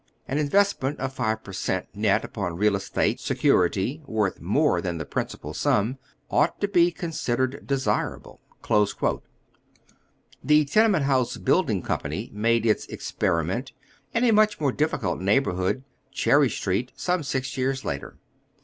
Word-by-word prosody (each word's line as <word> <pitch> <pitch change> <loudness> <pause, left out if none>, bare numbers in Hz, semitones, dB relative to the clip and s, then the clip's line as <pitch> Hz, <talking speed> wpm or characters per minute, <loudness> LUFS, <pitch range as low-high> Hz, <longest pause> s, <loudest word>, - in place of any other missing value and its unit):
An 140 +3 -1
investment 150 -3 +1
at 135 0 -3
five 110 -3 -1
per 95 - -10
cent, 95 - -2
net - - +1
upon 85 -1 -4
real 105 +1 +3
estate 95 0 -1
security 95 - +1
worth 105 -3 -1
more 145 - +2
than 90 -3 -3
the 80 - -4
principal - - -4
sum, 115 +6 +1 0.3
ought - - +2
to 205 - +1
be 175 -3 +4
considered 140 -7 -2
desirable." 135 -1 -2 2.0
The 150 0 +4
Tenement 195 0 +3
Honse 130 -3 +1
Building - - +1
Company - - -3
made 115 +2 +1
its 110 - +1
" - - -31
ex - - -6
periment 90 - -1 0.2
" - - -34
in 230 - +2
a 240 - +5
much 215 -1 +3
more 145 -3 +1
difficult 135 - -1
neighborhood, 100 +1 +1 0.3
Cher 135 +1 +3
ry 145 - +5
Street, 105 +2 -2
some 180 -1 0
six 130 -2 -3
years 130 0 -1
later. 70 - -5
130 Hz, 150 wpm, -25 LUFS, 105-150 Hz, 2.0 s, a